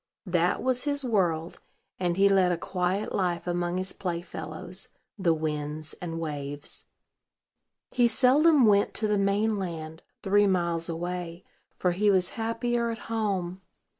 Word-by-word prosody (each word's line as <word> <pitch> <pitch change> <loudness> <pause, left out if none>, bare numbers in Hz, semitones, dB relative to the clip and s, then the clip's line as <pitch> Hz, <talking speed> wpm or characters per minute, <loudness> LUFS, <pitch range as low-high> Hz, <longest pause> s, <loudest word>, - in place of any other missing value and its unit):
That 175 -1 +1
was 255 0 +1
his 285 -2 0
world; 175 -8 0 0.4
and 175 -1 0
he 200 +1 +6
led 190 -2 +4
a 175 - 0
quiet 185 +3 -2
life 180 -3 -1
among 175 0 -1
his 185 +1 -2
playfellows, 175 -2 -4 0.3
the 180 -3 +3
winds 155 -1 -3
and 165 -2 -4
waves. 145 -2 -3 1.1
He 245 -1 +4
seldom 275 +4 +5
went 205 -1 +3
to 215 - +1
the 210 -1 +1
main 205 +2 +1
land, 160 -3 -5 0.2
three 205 +1 +4
miles 170 -3 +1
away; 175 +1 -4 0.3
for 180 - +1
he 205 +4 +2
was 185 -2 +3
happier 235 +1 -1
at 230 - -3 0.2
home. 190 -4 -1
185 Hz, 140 wpm, -27 LUFS, 170-210 Hz, 1.1 s, he